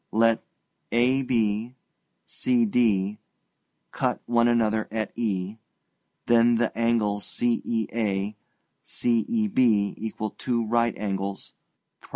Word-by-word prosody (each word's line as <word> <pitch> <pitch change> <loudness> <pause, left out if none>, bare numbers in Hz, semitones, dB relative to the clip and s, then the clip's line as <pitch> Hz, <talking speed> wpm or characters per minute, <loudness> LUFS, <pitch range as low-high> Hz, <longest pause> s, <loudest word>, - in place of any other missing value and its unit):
Let 115 0 +3 0.5
AB, 120 -2 +1 0.5
CD, 110 -4 +1 0.7
cut - - -1
one 120 0 +3
another 110 -2 +1
at 110 -1 -3
E, 100 -3 -2 0.7
then 120 0 +4
the 115 0 0
angles 110 -3 +1
CEA, 110 -4 -1 0.5
CEB 120 - +1
equal 110 -1 -4
two 120 -2 -2
right 115 +1 +1
angles 100 -1 -4 0.5
(prop. - - -19
115 Hz, 90 wpm, -25 LUFS, 105-120 Hz, 0.7 s, then